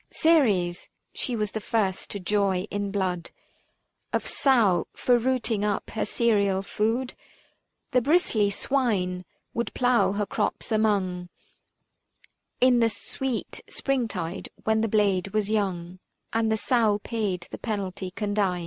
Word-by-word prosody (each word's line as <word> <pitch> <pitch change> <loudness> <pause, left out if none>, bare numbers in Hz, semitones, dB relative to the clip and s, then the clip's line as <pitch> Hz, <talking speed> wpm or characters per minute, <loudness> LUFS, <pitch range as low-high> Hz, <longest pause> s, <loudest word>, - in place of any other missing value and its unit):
Ceres 210 - +2
— - - -50
she 250 - -1
was 210 -3 -1
the 220 - -4
first 200 -3 -1
to 200 - -4
joy 195 -1 +1
in 205 0 -2
blood 185 -4 -2 0.8
375 - - -1
Of - - -5
sow, 230 -10 +3
for 245 -1 +3
rooting 235 -4 0
up 210 -1 -1
her 220 - -1
cereal 200 -4 +2
food. 230 +6 -1 0.8
The 250 -2 +3
bristly 245 - +3
swine 200 -7 0 0.3
would 235 -2 -2
plough 245 -5 +3
her 205 0 -1
crops 210 +3 -2
among 195 -5 +1 1.3
In 250 -1 +5
the 230 -1 +4
sweet 255 +3 -4
springtide 205 -10 -2
when 220 0 +2
the 225 - +1
blade 200 -2 +1
was 210 -1 +1
young; 185 -4 -1 0.3
And 225 0 +1
the 220 - +2
sow 220 -3 +2
paid 200 -6 -2
the - - -7
penalty 195 -4 -3
condign. 200 -2 -1
210 Hz, 140 wpm, -26 LUFS, 190-230 Hz, 1.3 s, In